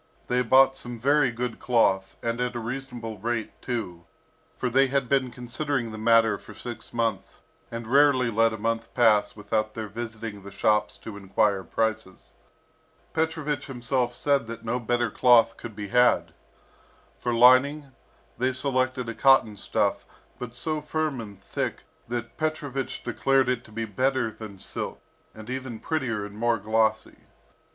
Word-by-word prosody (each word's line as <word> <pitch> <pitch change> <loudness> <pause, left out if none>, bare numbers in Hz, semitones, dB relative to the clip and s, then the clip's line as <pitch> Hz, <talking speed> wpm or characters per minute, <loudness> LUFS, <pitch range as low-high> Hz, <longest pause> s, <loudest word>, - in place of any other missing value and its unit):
They 125 0 +2
bought 135 +2 +5
some 120 -2 -5
very 140 +3 +3
good 120 0 -4
cloth, 95 -6 +2
and 115 +1 -1
at 125 0 -1
a - - -2
reasonable 120 -2 -5
rate 115 +1 -2
too, 95 -9 -4 0.5
for 125 - -1
they 135 +3 +4
had 135 -1 0
been 135 0 +2
considering 125 0 -2
the 110 - -7
matter 115 0 +4
for - - -13
six 120 -2 -8
months, 115 -4 -2 0.3
and 115 -1 -6
rarely 130 -1 +4
let 115 +1 +3
a 110 - -5
month 115 +1 -2
pass 110 -4 +4
without 110 +1 -2
their 110 -1 -4
visiting 110 -1 -6
the 100 - -10
shops 105 +2 +1
to 105 -2 -7
enquire 100 0 +1
prices. 110 0 -3 0.8
Petrovich 160 -3 -1
himself 125 -1 -1
said 140 -4 +1
that 115 0 -8
no 120 +2 -1
better 120 0 0
cloth 120 -2 +5
could 115 -3 -9
be 105 -1 -6
had. 95 -8 +3 0.9
For 120 - -1
lining, 130 +4 +5 0.5
they 130 +1 +1
selected 130 -1 0
a 115 - -3
cotton 135 -4 +4
stuff, - - 0 0.4
but 120 -1 -7
so 155 +2 -2
firm 150 -3 -2
and 100 -3 -10
thick, 95 - -4 0.3
that 120 0 -5
Petrovich 145 -4 -3
declared 135 -1 +2
it 125 -1 -1
to 110 - -16
be 115 +1 -3
better 130 +2 0
than 105 -3 -10
silk, - - -5 0.4
and 110 0 -10
even 130 -2 -5
prettier 125 -10 -2
and 100 0 -10
more 115 +1 +1
glossy. 110 +1 0
120 Hz, 160 wpm, -26 LUFS, 110-130 Hz, 0.9 s, bought